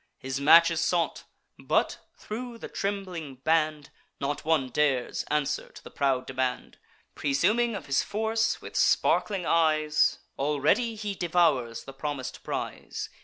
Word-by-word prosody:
His 135 Hz, +1 st, -4 dB
match 170 Hz, +4 st, +7 dB
is 165 Hz, -1 st, 0 dB
sought; 170 Hz, 0 st, 0 dB, 0.3 s
but, -, -, 0 dB, 0.2 s
thro' 235 Hz, +2 st, -6 dB
the -, -, -7 dB
trembling 185 Hz, -8 st, -4 dB
band, 155 Hz, +1 st, 0 dB, 0.3 s
Not 145 Hz, +2 st, -2 dB
one 155 Hz, -5 st, +1 dB
dares 130 Hz, -2 st, 0 dB
answer 150 Hz, -1 st, -1 dB
to -, -, -14 dB
the -, -, -11 dB
proud 135 Hz, -2 st, 0 dB
demand. 130 Hz, -1 st, -3 dB, 0.3 s
Presuming 215 Hz, +12 st, +1 dB
of 200 Hz, -, -6 dB
his 140 Hz, 0 st, +2 dB
force, 220 Hz, +2 st, 0 dB
with -, -, -9 dB
sparkling 195 Hz, -4 st, +2 dB
eyes 155 Hz, -2 st, +3 dB, 0.2 s
Already 150 Hz, -, +1 dB
he 210 Hz, -1 st, -4 dB
devours 165 Hz, -10 st, +1 dB
the 135 Hz, -, -10 dB
promis'd 135 Hz, -1 st, -5 dB
prize. -, -, -5 dB
155 Hz, 135 wpm, -27 LUFS, 140-195 Hz, 0.3 s, match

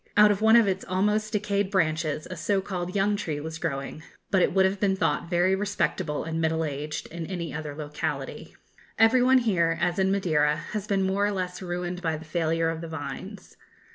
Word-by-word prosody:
Out 210 Hz, 0 st, +8 dB
of 205 Hz, 0 st, -1 dB
one 220 Hz, +1 st, +6 dB
of 230 Hz, -3 st, +6 dB
its 190 Hz, 0 st, -1 dB
almost 210 Hz, +3 st, 0 dB
decayed 205 Hz, -2 st, 0 dB
branches 155 Hz, -5 st, 0 dB
a -, -, -4 dB
so 195 Hz, +4 st, 0 dB
called 180 Hz, -1 st, -4 dB
young 200 Hz, +1 st, +2 dB
tree 155 Hz, -7 st, -3 dB
was 160 Hz, +2 st, -6 dB
growing, 140 Hz, -2 st, -4 dB, 0.3 s
but 190 Hz, -, +4 dB
it -, -, +3 dB
would 190 Hz, +1 st, +4 dB
have 190 Hz, +1 st, 0 dB
been 195 Hz, -1 st, +2 dB
thought 165 Hz, -2 st, 0 dB
very 180 Hz, +1 st, +3 dB
respectable 190 Hz, -6 st, -1 dB
and 165 Hz, 0 st, -3 dB
middle 160 Hz, 0 st, +1 dB
aged 150 Hz, +1 st, -4 dB
in 165 Hz, -1 st, -6 dB
any 175 Hz, -4 st, -4 dB
other 150 Hz, -2 st, -5 dB
locality. 150 Hz, 0 st, -5 dB, 0.4 s
Every 225 Hz, +3 st, +5 dB
one 260 Hz, +1 st, +5 dB
here, 175 Hz, -9 st, +2 dB
as 175 Hz, +1 st, 0 dB
in 190 Hz, 0 st, +3 dB
Madeira, 155 Hz, -6 st, +2 dB, 0.2 s
has 210 Hz, -1 st, -3 dB
been 195 Hz, -2 st, +1 dB
more 195 Hz, +2 st, +1 dB
or -, -, 0 dB
less 185 Hz, -2 st, -4 dB
ruined 180 Hz, 0 st, -4 dB
by 160 Hz, -3 st, -1 dB
the 160 Hz, -, -11 dB
failure 165 Hz, 0 st, 0 dB
of 165 Hz, 0 st, -5 dB
the 165 Hz, -, -6 dB
vines. 160 Hz, -2 st, -7 dB
180 Hz, 205 wpm, -26 LUFS, 160-200 Hz, 0.4 s, Out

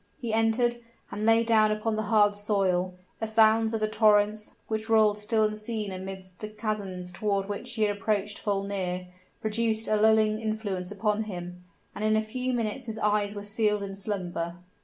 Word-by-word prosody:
He 235 Hz, -5 st, -3 dB
entered, 225 Hz, +2 st, +2 dB, 0.3 s
and 210 Hz, +2 st, -2 dB
lay 225 Hz, 0 st, +5 dB
down 220 Hz, -2 st, +4 dB
upon 215 Hz, +1 st, -1 dB
the 215 Hz, -, -1 dB
hard 210 Hz, -2 st, +5 dB
soil; 190 Hz, -3 st, 0 dB, 0.2 s
the 220 Hz, -, -2 dB
sounds 220 Hz, 0 st, +4 dB
of 225 Hz, -1 st, -2 dB
the 215 Hz, -, +2 dB
torrents, 210 Hz, -1 st, +2 dB
which 220 Hz, 0 st, -3 dB
rolled 215 Hz, -2 st, +4 dB
still 220 Hz, +1 st, +1 dB
unseen 215 Hz, -1 st, -2 dB
amidst 185 Hz, 0 st, -7 dB
the 215 Hz, -, -5 dB
chasms 205 Hz, -4 st, -4 dB
toward 200 Hz, +1 st, -1 dB
which 205 Hz, +4 st, -5 dB
he 220 Hz, -, +1 dB
had 205 Hz, -1 st, +2 dB
approached 205 Hz, 0 st, -1 dB
full 200 Hz, -2 st, -1 dB
near, 185 Hz, -2 st, -3 dB, 0.3 s
produced 220 Hz, 0 st, 0 dB
a 215 Hz, -, +2 dB
lulling 215 Hz, 0 st, +4 dB
influence 210 Hz, -5 st, -3 dB
upon 210 Hz, +1 st, -1 dB
him, 180 Hz, -2 st, -7 dB, 0.3 s
and 210 Hz, -, -5 dB
in 215 Hz, 0 st, +3 dB
a -, -, +3 dB
few 250 Hz, +4 st, -3 dB
minutes 240 Hz, +1 st, -2 dB
his 220 Hz, -1 st, -4 dB
eyes 210 Hz, -1 st, +1 dB
were 205 Hz, -, -5 dB
sealed 210 Hz, 0 st, 0 dB
in 195 Hz, -1 st, -5 dB
slumber. 180 Hz, -4 st, -3 dB
215 Hz, 180 wpm, -28 LUFS, 200-220 Hz, 0.3 s, lay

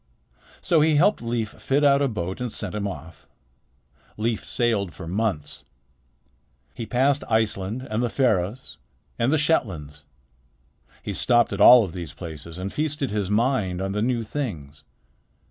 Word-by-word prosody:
So 165 Hz, -3 st, +3 dB
he 155 Hz, 0 st, +3 dB
helped 175 Hz, +8 st, +3 dB
Leif 115 Hz, -2 st, -2 dB
fit 140 Hz, +2 st, +1 dB
out 140 Hz, -1 st, +5 dB
a 140 Hz, -, +3 dB
boat 95 Hz, -3 st, -4 dB
and 125 Hz, -2 st, -2 dB
sent 105 Hz, -4 st, -4 dB
him 100 Hz, -1 st, -2 dB
off. 85 Hz, -3 st, -9 dB, 0.9 s
Leif 110 Hz, 0 st, -1 dB
sailed 110 Hz, -7 st, -1 dB
for 85 Hz, -, -8 dB
months. 95 Hz, -4 st, -2 dB, 1.1 s
He 115 Hz, -, -6 dB
passed 135 Hz, +4 st, +2 dB
Iceland 110 Hz, +2 st, 0 dB
and 110 Hz, +2 st, -1 dB
the 120 Hz, -, 0 dB
Faroes 105 Hz, -, -1 dB, 0.4 s
and 120 Hz, +3 st, +2 dB
the 155 Hz, -, +3 dB
Shetlands. 85 Hz, -, -1 dB, 1.0 s
He -, -, -4 dB
stopped 120 Hz, -3 st, +2 dB
at 100 Hz, -, -3 dB
all 125 Hz, +2 st, +9 dB
of 95 Hz, -, -5 dB
these 85 Hz, -4 st, -7 dB
places 80 Hz, -1 st, -8 dB
and 95 Hz, +2 st, -5 dB
feasted 150 Hz, -4 st, -2 dB
his 100 Hz, -3 st, -2 dB
mind 105 Hz, -5 st, +1 dB
on 95 Hz, 0 st, -2 dB
the 105 Hz, +1 st, -1 dB
new 120 Hz, 0 st, 0 dB
things. 80 Hz, -, -5 dB
110 Hz, 155 wpm, -24 LUFS, 95-130 Hz, 1.1 s, all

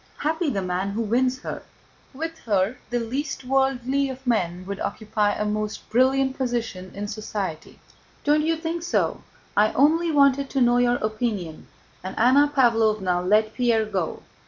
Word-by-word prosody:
Happy 320 Hz, +2 st, 0 dB
the 195 Hz, -7 st, -2 dB
man 185 Hz, +2 st, -2 dB
who 215 Hz, +3 st, -2 dB
wins 255 Hz, +4 st, +1 dB
her! -, -, -5 dB, 0.5 s
With 325 Hz, +4 st, -6 dB
her 205 Hz, +2 st, 0 dB
the 245 Hz, -, 0 dB
least 265 Hz, +5 st, -3 dB
worldly 270 Hz, +1 st, +1 dB
of 265 Hz, 0 st, -8 dB
men 185 Hz, -7 st, 0 dB
would 200 Hz, +1 st, -5 dB
occupy 210 Hz, -1 st, -1 dB
a 210 Hz, -, -2 dB
most 210 Hz, 0 st, -3 dB
brilliant 265 Hz, +2 st, +3 dB
position 230 Hz, -8 st, -3 dB
in 205 Hz, +1 st, -4 dB
society. 205 Hz, -6 st, -5 dB, 0.5 s
Don't 295 Hz, +1 st, +3 dB
you 325 Hz, +2 st, +1 dB
think 330 Hz, +1 st, -3 dB
so? 350 Hz, +1 st, 0 dB, 0.3 s
I 210 Hz, +1 st, +4 dB
only 320 Hz, +5 st, +3 dB
wanted 280 Hz, -2 st, +3 dB
to 275 Hz, -, -1 dB
know 245 Hz, -1 st, +4 dB
your 245 Hz, 0 st, +3 dB
opinion," 215 Hz, -7 st, -3 dB, 0.4 s
and 185 Hz, -, -6 dB
Anna 275 Hz, +5 st, +5 dB
Pávlovna 220 Hz, -9 st, +2 dB
let 215 Hz, +1 st, +3 dB
Pierre 235 Hz, -3 st, +2 dB
go. 190 Hz, -6 st, -3 dB
240 Hz, 160 wpm, -24 LUFS, 210-270 Hz, 0.5 s, Anna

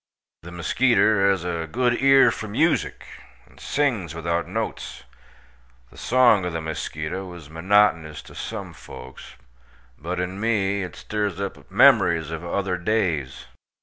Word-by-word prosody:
The 85 Hz, -, -10 dB
muskeeter 105 Hz, +2 st, +2 dB
haz 95 Hz, -3 st, 0 dB
a 85 Hz, -2 st, -3 dB
good 120 Hz, 0 st, +1 dB
ear 135 Hz, 0 st, +6 dB
for 110 Hz, -, -6 dB
musik, 155 Hz, +11 st, 0 dB, 0.4 s
and -, -, -21 dB
sings 115 Hz, -, -1 dB
without 85 Hz, +1 st, -2 dB
notes. -, -, -5 dB, 0.9 s
The -, -, -17 dB
song 120 Hz, -6 st, +4 dB
ov 90 Hz, -2 st, -3 dB
the 85 Hz, -, -2 dB
muskeeto 80 Hz, +3 st, -5 dB
iz 80 Hz, -3 st, -14 dB
monotonous 85 Hz, -3 st, +2 dB
to -, -, -14 dB
sum -, -, -6 dB
folks, 65 Hz, +1 st, -12 dB, 0.6 s
but 90 Hz, +4 st, -4 dB
in 90 Hz, +2 st, -4 dB
me 100 Hz, -3 st, 0 dB
it 90 Hz, -, -6 dB
stirs 105 Hz, -3 st, -3 dB
up 100 Hz, -1 st, -3 dB
the -, -, -19 dB
memorys 90 Hz, -, +4 dB
ov 80 Hz, 0 st, -5 dB
other 90 Hz, +1 st, -2 dB
days. 85 Hz, -, -1 dB
95 Hz, 145 wpm, -23 LUFS, 85-110 Hz, 0.9 s, ear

